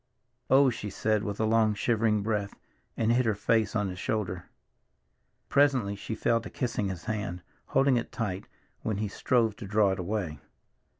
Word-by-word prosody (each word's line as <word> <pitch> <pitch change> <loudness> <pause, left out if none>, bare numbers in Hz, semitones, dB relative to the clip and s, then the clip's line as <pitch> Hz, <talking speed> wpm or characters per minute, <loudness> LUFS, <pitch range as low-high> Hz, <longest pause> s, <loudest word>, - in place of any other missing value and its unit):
"Oh," 135 0 +6
she 105 -2 -5
said 105 +1 0
with 100 -2 -4
a 110 - +2
long, 110 -1 +3
shivering 110 -1 +1
breath, 105 -2 -2 0.4
and 115 0 +2
hid 125 +2 +3
her 110 - +2
face 110 +1 +1
on 105 -2 +1
his 90 0 -6
shoulder. 95 -5 -3 1.0
Presently 135 -8 +3
she 110 +2 -5
fell 115 +1 +1
to - - -8
kissing 115 -5 -2
his 90 -2 -6
hand, 105 -5 -3 0.2
holding 135 -1 +3
it 120 - -3
tight 95 -5 -3 0.3
when 110 -3 -2
he 105 0 -1
strove 115 +1 +1
to 110 -4 -7
draw 105 0 +3
it 95 - -3
away. 90 -5 -3
110 Hz, 175 wpm, -28 LUFS, 100-115 Hz, 1.0 s, Oh